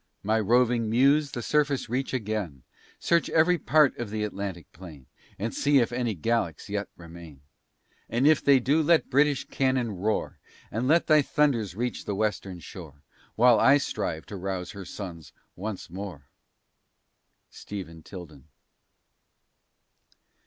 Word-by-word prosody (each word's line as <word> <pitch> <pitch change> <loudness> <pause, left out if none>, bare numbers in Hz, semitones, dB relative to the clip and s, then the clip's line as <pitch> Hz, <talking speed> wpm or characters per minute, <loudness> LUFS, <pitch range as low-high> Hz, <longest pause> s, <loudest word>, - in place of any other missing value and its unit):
My 110 +2 +1
roving 120 +1 +2
muse 140 +6 +3
the 120 -3 -5
surface 145 -1 +1
reach 130 +3 -2
again, 105 - -3 0.3
Search 170 0 +1
every 165 +2 +3
part 150 -1 +3
of 120 -3 -4
the 105 0 -3
Atlantic 100 -5 -5
plain, 80 -7 -12 0.3
And 110 +3 -3
see 145 -1 +2
if 120 -3 +2
any 120 -3 -1
Gallics 90 -2 -2
yet 100 -1 -2
remain; 85 -4 -12 0.7
And 120 +4 +1
if 155 -1 +4
they 140 -2 +5
do, 140 +6 +2
let 160 0 +2
British 145 +1 +2
cannon 130 -3 0
roar; 105 +3 -2 0.3
And 120 +3 -2
let 165 +4 +4
thy 155 -1 +5
thunders 130 -10 0
reach 120 +2 -3
the 100 - -2
western 95 -3 -2
shore. 75 -4 -11 0.3
While 120 -1 +5
I 135 - +6
shall 140 - -3
strive 80 0 -3
to 100 - -8
rouse 95 -1 -4
her 100 -2 -9
sons 85 -7 -8 0.2
once 100 +1 -6
more. 90 -5 -8 1.3
STEPHEN 90 -5 -8
TILDEN. 80 -6 -11
110 Hz, 145 wpm, -27 LUFS, 95-135 Hz, 1.3 s, I